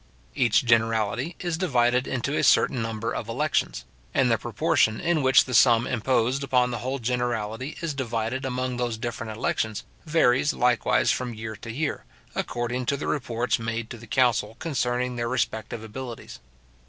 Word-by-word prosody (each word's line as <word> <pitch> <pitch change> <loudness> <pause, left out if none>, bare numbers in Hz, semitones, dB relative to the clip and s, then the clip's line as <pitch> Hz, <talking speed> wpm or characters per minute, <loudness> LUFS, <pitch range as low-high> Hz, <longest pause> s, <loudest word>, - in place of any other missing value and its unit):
Each 125 -1 +2
generality 115 +6 +1
is 175 -2 -2
divided 125 -7 +2
into 135 +3 -2
a - - +1
certain 125 - +4
number 115 0 -3
of 115 - -4
elections; 115 - -1 0.3
and - - +3
the - - +3
proportion 110 0 +1
in 170 -3 +1
which 130 0 +5
the 125 - -6
sum 115 0 +5
imposed 130 +2 0
upon 125 -2 +2
the 120 - -3
whole 130 +4 -2
generality 120 +1 -2
is 165 -3 -1
divided 120 -1 -2
among 130 -1 -2
those 120 -2 -1
different 115 -1 -5
elections, 110 -1 -1 0.2
varies 150 -3 +3
likewise 125 -1 +2
from 125 -2 -3
year 110 0 -6
to 115 - -7
year, 145 +5 -3 0.3
according 120 +1 -3
to 140 - +1
the - - -5
reports 120 -4 -1
made 115 0 -4
to 120 - -6
the 115 - -12
council 115 -3 +2
concerning 125 -5 -1
their 120 0 -1
respective 110 -3 -2
abilities. 120 +2 -8
120 Hz, 165 wpm, -25 LUFS, 115-130 Hz, 0.3 s, which